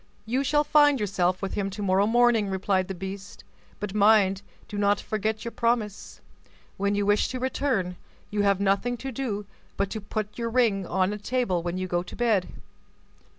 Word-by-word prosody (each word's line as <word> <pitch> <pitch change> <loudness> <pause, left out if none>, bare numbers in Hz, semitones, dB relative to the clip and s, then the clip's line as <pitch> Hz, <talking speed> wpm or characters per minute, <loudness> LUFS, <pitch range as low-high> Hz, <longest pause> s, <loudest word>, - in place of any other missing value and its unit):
"You 250 +5 0
shall 295 +2 +2
find 290 -2 +4
yourself 185 -2 0
with 195 - -3
him 195 -1 -1
to 205 +2 -6
morrow 195 +1 +3
morning," 235 -2 +3
replied 190 -1 0
the 190 - -5
beast; 195 +2 -8 0.4
"but 205 -1 -4
mind, 200 -2 +4 0.3
do 205 - -5
not 205 0 +3
forget 215 +1 -2
your 235 - -3
promise. 230 -4 -2 0.6
When 200 +1 0
you 205 0 0
wish 205 +1 +3
to 255 - -4
return, 245 -9 -1 0.3
you 210 0 0
have 200 -1 +3
nothing 200 +5 +1
to 265 +3 -5
do 220 -5 -3 0.3
but 200 -1 -1
to 220 - -4
put 210 +2 -5
your 230 0 -1
ring 225 -6 +2
on 190 +2 +1
a 210 - -6
table 220 -5 0
when 175 +1 -3
you 185 - -2
go 175 -1 0
to 175 - -10
bed. 220 -6 +1
205 Hz, 190 wpm, -26 LUFS, 195-230 Hz, 0.6 s, find